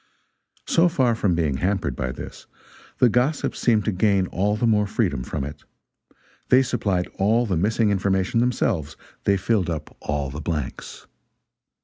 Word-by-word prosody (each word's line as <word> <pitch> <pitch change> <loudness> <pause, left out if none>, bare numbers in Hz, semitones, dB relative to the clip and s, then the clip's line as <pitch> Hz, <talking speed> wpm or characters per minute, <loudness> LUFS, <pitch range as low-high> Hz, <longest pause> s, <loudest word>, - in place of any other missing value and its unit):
So 170 +1 +3
far 130 -7 +2
from 100 -6 +1
being 75 -5 0
hampered 90 -6 -1
by - - -3
this, - - -9 0.5
the 125 - +5
gossips 125 +6 0
seemed 110 -3 +2
to 110 - +1
gain 95 0 +2
all 100 +3 0
the 115 - 0
more 105 -2 +3
freedom 95 - -1
from 70 +3 -4
it. 70 +1 -8 0.9
They 130 +1 +6
supplied 100 -8 -1
all 110 +5 +3
the 95 -5 -1
missing 105 +5 +1
information 95 +2 +1
themselves, 105 - 0 0.3
they 100 -1 +3
filled 95 -2 0
up 80 -3 -5
all 70 -2 -3
the 75 +3 -6
blanks. 75 -3 -5
100 Hz, 155 wpm, -23 LUFS, 80-115 Hz, 0.9 s, They